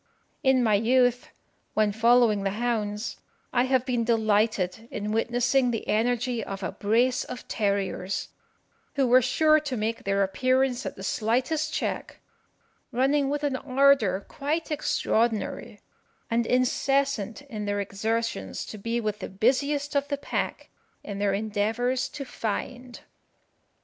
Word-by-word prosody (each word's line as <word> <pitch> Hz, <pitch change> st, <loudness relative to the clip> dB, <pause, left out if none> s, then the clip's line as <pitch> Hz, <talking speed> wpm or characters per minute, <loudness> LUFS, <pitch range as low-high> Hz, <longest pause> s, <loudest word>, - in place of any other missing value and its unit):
In 265 Hz, -1 st, +3 dB
my 220 Hz, -2 st, +3 dB
youth, 245 Hz, +3 st, +2 dB, 0.5 s
when 215 Hz, -1 st, +3 dB
following 225 Hz, -1 st, +4 dB
the 195 Hz, -, 0 dB
hounds, 220 Hz, -2 st, -2 dB, 0.4 s
I 245 Hz, -, +3 dB
have 260 Hz, -1 st, +2 dB
been 245 Hz, -3 st, 0 dB
delighted 220 Hz, -2 st, +1 dB
in 210 Hz, +1 st, -4 dB
witnessing 245 Hz, +3 st, +2 dB
the 230 Hz, -2 st, -3 dB
energy 240 Hz, +1 st, 0 dB
of 195 Hz, 0 st, -6 dB
a -, -, -2 dB
brace 240 Hz, +5 st, +1 dB
of 250 Hz, -, -8 dB
terriers, 200 Hz, -2 st, -1 dB, 0.7 s
who 275 Hz, -2 st, +3 dB
were 250 Hz, +1 st, +6 dB
sure 310 Hz, +5 st, +4 dB
to 285 Hz, -5 st, -4 dB
make 220 Hz, +2 st, -2 dB
their 200 Hz, 0 st, +1 dB
appearance 255 Hz, +6 st, +1 dB
at -, -, -6 dB
the 190 Hz, -, -9 dB
slightest 255 Hz, +10 st, 0 dB
check, -, -, -3 dB, 0.7 s
running 270 Hz, +3 st, +2 dB
with 290 Hz, +1 st, -2 dB
an 285 Hz, -2 st, 0 dB
ardour 260 Hz, -8 st, +3 dB
quite 310 Hz, +3 st, -3 dB
extraordinary, 235 Hz, -6 st, -1 dB, 0.5 s
and 230 Hz, 0 st, +1 dB
incessant 255 Hz, -2 st, +1 dB
in 215 Hz, -7 st, -6 dB
their 205 Hz, 0 st, -1 dB
exertions 220 Hz, +4 st, -2 dB
to 215 Hz, -, -8 dB
be 230 Hz, +3 st, -1 dB
with 215 Hz, -2 st, -2 dB
the -, -, -6 dB
busiest 280 Hz, +8 st, 0 dB
of 280 Hz, 0 st, +1 dB
the 285 Hz, -, -2 dB
pack 285 Hz, -, -4 dB, 0.3 s
in 200 Hz, -1 st, -6 dB
their 200 Hz, -1 st, +1 dB
endeavours 220 Hz, +5 st, -1 dB
to 285 Hz, -2 st, -7 dB
find. 245 Hz, +2 st, -5 dB
235 Hz, 140 wpm, -26 LUFS, 210-260 Hz, 0.7 s, were